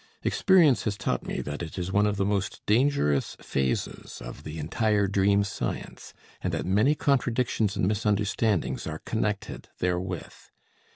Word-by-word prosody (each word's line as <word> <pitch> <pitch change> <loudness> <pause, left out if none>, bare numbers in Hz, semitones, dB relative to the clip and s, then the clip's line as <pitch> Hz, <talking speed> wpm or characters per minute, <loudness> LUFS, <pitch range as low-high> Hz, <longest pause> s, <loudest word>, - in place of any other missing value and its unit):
Experience 175 - +4
has 100 -2 -1
taught 95 - -2
me - - -2
that 75 +2 -5
it 85 +1 -6
is 90 0 -3
one 105 +2 +3
of 105 -1 -1
the 100 - +1
most 100 -1 -1
dangerous 110 - +2
phases 65 -1 -2
of - - -9
the 75 +1 -7
entire 105 +6 +1
dream 100 +1 +3
science, 100 - -5 0.3
and - - -1
that - - -2
many 105 +11 +3
contradictions 125 -7 +1
and 90 - +1
misunderstandings 105 0 0
are 80 0 -6
connected 105 -2 -2
therewith. 90 0 -2
100 Hz, 150 wpm, -27 LUFS, 90-110 Hz, 0.3 s, Experience